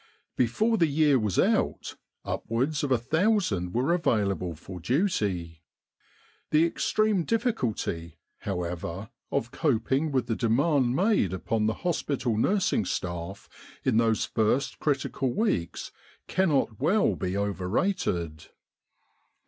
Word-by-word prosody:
Before 215 - +1
the 165 - +4
year 145 -2 +3
was 105 -5 -1
out, - - +1 0.3
upwards 135 +7 -1
of 140 - -1
a 130 - +5
thousand 155 - +1
were 130 +8 +2
available 100 - 0
for 90 +4 -9
duty. 95 - -1 0.9
The 155 +2 +4
extreme 210 +2 +1
diffi 230 +5 +1
culty, 95 - -3 0.2
however, 90 +2 -4 0.2
of 125 -4 -1
coping 140 +1 0
with 130 -4 +1
the 115 -1 -1
demand 130 +2 +2
made 185 - +2
upon 105 +4 -1
the 110 - 0
hospital 140 -8 0
nursing 200 - +2
staff 85 +2 -4 0.4
in 125 -4 +3
those 115 -2 +2
first 115 +5 0
critical 135 -3 -1
weeks 145 - -1 0.4
cannot 145 - +1
well 165 - +2
be 90 +2 -2
overrated. 95 - -1
120 Hz, 115 wpm, -27 LUFS, 100-160 Hz, 0.9 s, a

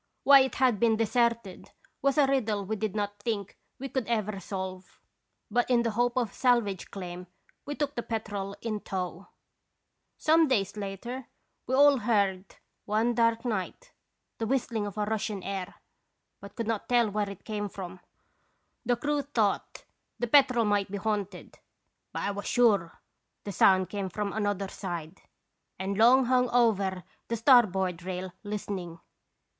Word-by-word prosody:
Why 280 0 +9
it 265 0 +1
had 255 -5 +2
been 225 -1 +3
deserted 230 -3 0 0.3
was 275 +2 +1
a 290 - +6
riddle 225 -7 0
we 220 +3 -2
did 215 -1 -3
not 205 -1 -3
think 205 -2 -3 0.2
we 270 - -5
could 260 -2 -3
ever 215 -4 -1
solve, 185 -1 -6 0.5
but 240 +3 +1
in 240 -2 +3
the 230 - 0
hope 240 +3 0
of 235 -5 0
salvage 235 -7 +1
claim 180 -1 -7 0.4
we 290 - -3
took 290 -1 -2
the 240 - -3
Petrel 205 -4 -4
in 215 -2 -2
tow. 185 -1 -5 0.9
"Some 320 +1 +4
days 205 -7 0
later 215 +5 -6 0.4
we 260 - +1
all 285 -1 +6
heard^ 200 -4 +1 0.4
one 220 +3 +1
dark 230 0 +2
night, 240 - -3 0.5
the 225 - -1
whistling 225 -4 -1
of 205 - -8
a 210 - 0
Russian 215 -2 -2
air, 195 -1 -5 0.6
but 200 0 -12
could 230 - -3
not 225 -1 -3
tell 240 -3 +3
where 205 0 -1
it 200 - -10
came 205 -2 -3
from. 185 -1 -8 0.8
The 245 - +2
crew 290 +4 -1
thought 225 -8 -1 0.3
the 240 - -1
Petrel 250 -2 +4
might 205 -2 +1
be 200 - -4
haunted; 200 -2 -4 0.5
but - - -4
I 200 - 0
was 200 0 -6
sure 205 -9 +2 0.4
the 205 - -5
sound 185 0 +4
came 200 -2 -3
from 200 +2 -3
another 205 -2 -1
side, 175 -3 -6 0.6
and 195 +1 -3
long 245 +5 +6
hung 250 0 +2
over 200 -7 +2 0.2
the 230 - -2
starboard 190 -8 +4
rail 185 0 -5
listening. 195 -5 -5
210 Hz, 160 wpm, -28 LUFS, 195-240 Hz, 0.9 s, Why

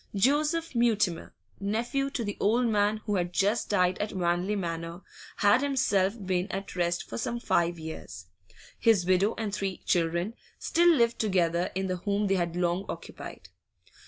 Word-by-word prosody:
Joseph 295 - +2
Mutimer, 215 -8 +1 0.3
nephew 235 +7 -1
to 265 -4 -3
the 205 -2 -3
old 235 +5 +2
man 210 -1 +1
who 205 -2 0
had 175 -1 -1
just 205 +5 +1
died 180 -3 +2
at 210 - -2
Wanley 180 +2 0
Manor, 170 -1 -4 0.3
had 205 +5 +4
himself 230 -8 +1
been 185 +1 -1
at 195 0 -5
rest 175 -1 -1
for 115 - -5
some 240 - -2
five 170 -6 +1
years; 155 - -8 0.5
his 215 -6 +4
widow 185 +4 +2
and 215 -3 -3
three 195 -3 -2
children 170 +4 +1 0.2
still 345 +1 +3
lived 235 -7 +2
together 175 -4 +1
in 190 0 -1
the 185 -1 -2
home 200 +3 -1
they 195 - +2
had 170 -2 -1
long 175 +1 0
occupied. - - -8
195 Hz, 160 wpm, -28 LUFS, 175-225 Hz, 0.5 s, had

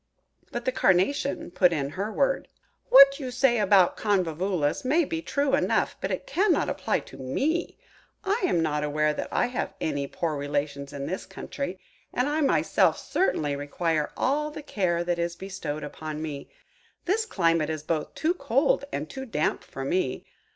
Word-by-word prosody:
But 240 0 -4
the 255 - +2
Carnation 195 +5 +1
put 180 0 +4
in 140 -4 -1
her 200 +6 -3
word: - - +1 0.4
"What 275 +1 +8
you 260 -3 -4
say 250 -1 +2
about 195 -3 +5
the - - -11
Convolvulus 180 -5 0
may 305 +6 +3
be 325 +2 -3
true 280 -3 0
enough, 275 - +2
but - - -2
it - - -3
cannot 405 -6 +2
apply - - -1
to - - -13
me. 280 - -1 0.5
I 405 +3 0
am 175 - +2
not 150 -2 0
aware 150 +1 +1
that - - -4
I - - +2
have 240 -6 -3
any 145 -3 -2
poor 160 +1 -2
relations 145 0 -3
in 140 -1 -5
this 185 +5 -4
country, 195 +2 -5 0.3
and 250 +2 0
I 300 +2 0
myself 280 - +3
certainly 150 - 0
require 150 +2 -1
all 300 +3 +1
the 300 0 -8
care 180 - 0
that 175 0 -1
is 170 0 -1
bestowed 175 -5 -5
upon 155 +1 -6
me. 150 -3 -6 0.6
This 440 +5 +1
climate 165 - +1
is 155 -1 -3
both 155 -1 -2
too 325 +2 +1
cold 275 -2 +1
and 150 +2 -3
too 265 +7 -7
damp 155 -9 -1
for 135 - -7
me. 135 -4 -1
185 Hz, 175 wpm, -26 LUFS, -, 0.6 s, What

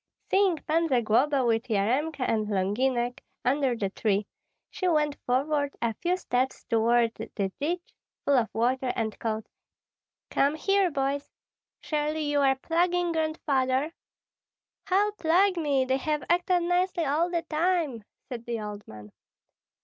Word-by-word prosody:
Seeing 390 -3 +4
Pan 330 +2 +2
Zagloba 255 +2 +2
with 230 0 +1
Yaremka 255 +8 0
and 215 -2 0
Longinek 240 +6 0 0.3
under 265 -1 +2
the 200 -4 -2
tree, 205 0 0 0.5
she 370 - -2
went 300 -4 +2
forward 285 +3 +1
a 235 -1 0
few 355 - -1
steps 260 -6 -1
toward 230 0 +2
the 195 -5 -4
ditch, 345 +4 -3 0.3
full 285 - +4
of 235 -4 +2
water, 250 +3 0
and 220 -2 -3
called: 220 -1 -2 0.9
"Come 280 +2 +2
here, 390 +3 +2
boys! 280 -1 -2 0.5
Surely 305 0 -1
you 290 -1 +1
are 270 -1 +4
plaguing 345 +4 +1
Grandfather?" 300 -3 0 0.9
"How 400 +3 +2
plague 370 0 +2
me! 285 -5 +1
They 260 +1 +1
have 300 0 -1
acted 355 0 +2
nicely 355 -1 +1
all 310 +5 +1
the 340 -1 -1
time," 315 - 0 0.2
said 245 -3 -7
the 235 -1 -2
old 210 -1 -7
man. 105 -1 -11
280 Hz, 140 wpm, -27 LUFS, 235-330 Hz, 0.9 s, Seeing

